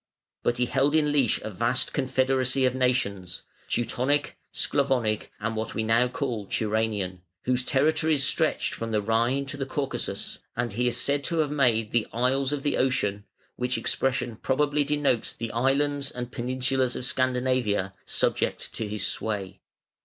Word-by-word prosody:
But 120 - 0
he 125 - +2
held 135 +4 +2
in 150 -2 +3
leash 140 -6 +3
a 110 - -5
vast 115 +6 0
confederacy 130 0 +2
of 130 - +2
nations 120 -8 -1 0.3
Teutonic, 130 +4 0 0.2
Sclavonic, 125 -6 0
and 115 +1 -2
what 110 0 -3
we 110 - 0
now 115 +3 +3
call 125 -5 -3
Turanian, 105 -4 -1 0.2
whose 125 0 +2
territories 155 +2 +2
stretched - - +1
from 115 - -4
the 110 -1 +1
Rhine 115 +6 +1
to 145 +1 -6
the 135 - -2
Caucasus, 135 0 -3 0.2
and 120 -2 -2
he 125 +4 +1
is 120 - +1
said 140 0 +1
to 170 - -1
have 155 -2 +1
made 120 -7 +2
"the 115 -2 +1
isles 130 +3 +1
of 145 -2 -2
the 145 - +1
Ocean", 105 -6 0 0.3
which 125 +1 0
expression 125 -3 -1
probably 145 +3 +1
denotes 145 -5 0
the 115 -1 -5
islands 140 +3 +1
and 125 0 -6
peninsulas 130 +1 0
of 125 - -3
Scandinavia, 125 -7 +1
subject - - -1
to 110 - -3
his 105 0 -2
sway. 100 -3 -2
125 Hz, 160 wpm, -26 LUFS, 115-135 Hz, 0.3 s, in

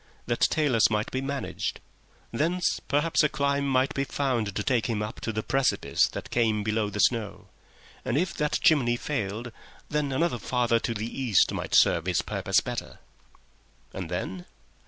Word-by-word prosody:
That 120 -1 -1
talus 140 -8 +3
might 105 -1 -1
be 130 - -2
managed. 140 0 -3 0.5
Thence 170 +9 0
perhaps 150 +4 +2
a 150 - +3
climb 140 0 0
might 130 0 +2
be 140 - 0
found 125 -8 -1
to 105 - -1
take 120 -3 +1
him 110 -3 -1
up 105 - -6
to 110 - -2
the 110 0 -3
precipice 135 0 +2
that - - -8
came 110 -3 +1
below 105 0 0
the 105 0 -6
snow; 110 -2 0 0.5
and 130 +1 -1
if 175 +3 0
that 150 0 +1
chimney 140 -9 +4
failed, 120 -4 -3 0.4
then 150 -2 -1
another 150 -2 0
farther 120 0 +1
to 115 - -3
the 105 +1 -3 0.2
east 115 -8 +3
might - - -2
serve 85 +2 +4
his 90 - +1
purpose - - +1
better. - - -6 1.0
And 95 -4 -5
then? 90 0 -4
120 Hz, 170 wpm, -27 LUFS, 105-140 Hz, 1.0 s, chimney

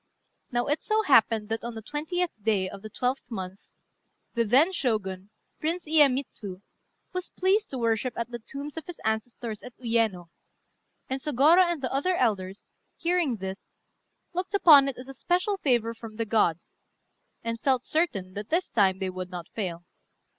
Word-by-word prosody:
Now 240 0 +1
it 295 +2 0
so 435 0 +1
happened 225 - +4
that, 225 0 -2
on 235 0 -5
the 220 - -7
20th 320 - -2
day 200 -3 +1
of 195 +1 -9
the 215 - -8
12th 250 +5 -2
month, 190 -4 -5 0.7
the 235 - +2
then 265 - +5
Shogun, 200 - -1 0.3
Prince 330 +3 -2
Iyémitsu, 265 -10 +1 0.5
was 365 0 -4
pleased 395 +3 +1
to 265 - -4
worship 230 +1 0
at 235 +1 -3
the 240 - -5
tombs 280 +6 -8
of 320 - -6
his 350 - -8
ancestors 220 0 -2
at 250 - -11
Uyéno; 225 -8 0 0.8
and 265 0 -3
Sôgorô 310 +6 +5
and 315 -5 -4
the 255 - -2
other 355 +7 +1
elders, 200 - -1 0.2
hearing 340 -7 +1
this, 190 -1 -6 0.7
looked 370 +3 -2
upon 295 -8 +8
it 270 - -6
as 250 - -9
a 270 - -8
special 365 +7 0
favour 240 - +1
from 225 -1 -10
the 230 +1 -1
gods, 205 -7 0 0.7
and 230 0 -3
felt 260 -2 +2
certain 205 - 0
that 205 +2 -6
this 345 +3 0
time 190 -4 +3
they 190 -1 -2
would 185 0 -6
not 175 -2 -7
fail. 175 -5 -4
240 Hz, 170 wpm, -27 LUFS, 210-300 Hz, 0.8 s, upon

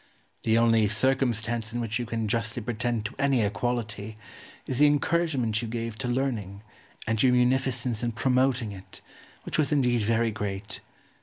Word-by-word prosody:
The 110 0 +2
only 115 -2 +4
circumstance 115 -1 0
in 120 - -3
which 115 0 -2
you 120 - -3
can 115 -1 -2
justly 115 +1 -2
pretend 120 -1 -2
to 110 - -4
any 135 -4 +3
equality 110 0 -2 0.5
is 130 - -3
the 150 - +7
encouragement 145 -7 +1
you 115 - -4
gave 115 0 -4
to 130 - -2
learning 115 -6 -2 0.4
and 115 -1 0
your 130 -2 +5
munificence 125 -1 +1
in 120 -1 -1
promoting 125 -2 +1
it, 95 -1 -12 0.4
which - - -3
was 150 -2 +2
indeed 125 -5 +2
very 115 +1 +1
great. 100 -1 -5
115 Hz, 160 wpm, -27 LUFS, 110-125 Hz, 0.5 s, the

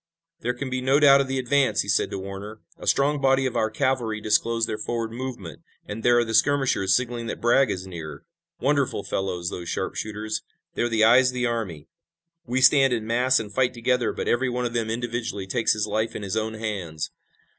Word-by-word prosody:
"There 125 -5 -2
can 130 +1 -5
be 130 0 -1
no 135 +3 +3
doubt 140 -2 +7
of 135 - -2
the 135 0 -2
advance!" 135 +2 +2
he - - -6
said - - +1
to - - -4
Warner. 100 +3 -8 0.2
"A - - -9
strong 140 +1 +2
body 135 0 +3
of 130 - -2
our 110 - +1
cavalry 120 -3 -1
disclosed 115 +2 +1
their 105 - -4
forward 115 0 -3
movement, 120 -9 -7 0.2
and 105 +2 -6
there 120 +1 +4
are 120 - +3
the 115 - -4
skirmishers 130 -8 +3
signaling 120 -1 -2
that - - -4
Bragg 120 +2 +3
is 95 -2 -3
near. 85 -4 -8 0.4
Wonderful 140 -6 0
fellows, 90 -2 -3
those 85 -1 -6
sharpshooters! 110 0 -3 0.3
They're 120 - 0
the 110 -1 +2
eyes 125 +3 +6
of 125 - -6
the 125 0 0
army. 110 -11 -3 0.6
We 125 +2 0
stand 135 -1 +6
in 110 -2 -2
mass 125 +3 +3
and 105 -2 -7
fight 125 +1 +1
together, 120 0 +1
but - - -5
every 125 +2 +1
one 125 0 -2
of 120 - -3
them 115 -2 -1
individually 115 -3 -3
takes 115 +4 +1
his 105 -1 -1
life 110 +1 -2
in 105 - -5
his 95 0 -3
own 110 0 -2
hands. 95 -8 -4
115 Hz, 210 wpm, -24 LUFS, 105-130 Hz, 0.6 s, doubt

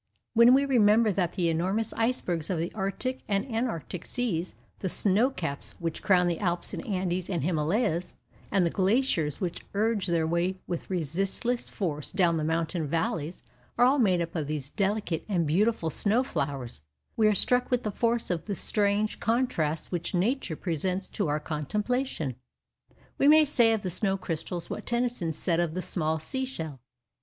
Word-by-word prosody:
When 235 +2 +7
we 280 +1 +3
remember 225 -4 +4
that 180 -3 0
the 180 -3 0
enormous 190 +7 0
icebergs 185 -9 -1
of 185 - 0
the 165 +2 -3
Arctic 215 +6 -2
and 200 +1 +1
Antarctic 225 - -3
seas, 185 -9 -2 0.2
the 190 - -2
snow 210 +8 +3
caps 165 - -5
which 165 -2 -4
crown 180 -3 +4
the 170 -2 -1
Alps 175 -3 -1
and - - -4
Andes 185 -3 -1
and 170 -7 -1
Himalayas, 175 - 0 0.4
and 190 -3 +3
the 170 - +1
glaciers 190 - +1
which 175 -3 -3
urge 210 -2 +1
their 170 -2 +1
way 170 +3 0
with 175 -2 -5
resistless 190 - -1
force 150 -7 -3
down 175 -3 +2
the 155 - -1
mountain 160 0 -1
valleys, 165 +1 -2 0.3
are 245 - +6
all 275 +3 +4
made 185 -7 +3
up 170 +1 -4
of 155 -4 -2
these 150 -2 -4
delicate 200 -4 -1
and 175 -5 +1
beautiful 175 +1 +1
snow 215 - +1
flowers, 135 - -4 0.3
we 220 -2 +4
are 210 - +3
struck 250 +5 +3
with 250 -1 +1
the 215 - -1
force 230 0 0
of 170 -2 -2
the 205 - -3
strange 205 +1 0
contrasts 225 -11 0
which 175 0 -2
Nature 195 - 0
presents 185 +3 -2
to 200 - -2
our 150 +1 0
contemplation. 165 - -2 0.8
We 280 - +4
may 310 +1 +7
say 240 -6 +4
of 220 -2 +1
the 185 - -1
snow 195 +2 +1
crystals 170 -1 -4
what - - -6
Tennyson 240 -8 0
said 165 +2 -1
of 170 -2 0
the 185 - -1
small 160 -2 0
sea 260 - -3
shell. 160 - -6
185 Hz, 175 wpm, -28 LUFS, 165-225 Hz, 0.8 s, When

